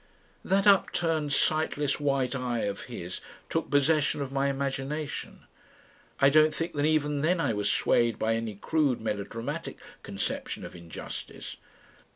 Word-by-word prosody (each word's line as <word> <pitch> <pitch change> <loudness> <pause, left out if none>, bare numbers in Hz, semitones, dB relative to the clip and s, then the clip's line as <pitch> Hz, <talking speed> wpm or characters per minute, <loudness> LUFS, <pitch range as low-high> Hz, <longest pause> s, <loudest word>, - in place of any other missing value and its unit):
That 195 +1 +2
upturned 165 -6 +3
sightless 150 -1 +1
white 135 -3 +1
eye 125 -3 -1
of 100 -1 -3
his - - -6 0.3
took - - -1
possession 145 +1 +3
of 140 -2 -3
my 135 0 +1
imagination. 140 +2 -3 0.7
I 140 0 +6
don't 155 +1 +5
think 165 +1 -3
that 145 0 +1
even 150 -2 +1
then 170 +4 +2
I 140 - +1
was 105 -1 +1
swayed 115 -2 +2
by 110 +1 +1
any 115 -2 -2
crude 145 +3 +1
melodramatic 110 +1 -4 0.2
conception - - -4
of - - -10
injustice. 85 -2 -8
140 Hz, 140 wpm, -28 LUFS, 120-155 Hz, 0.7 s, I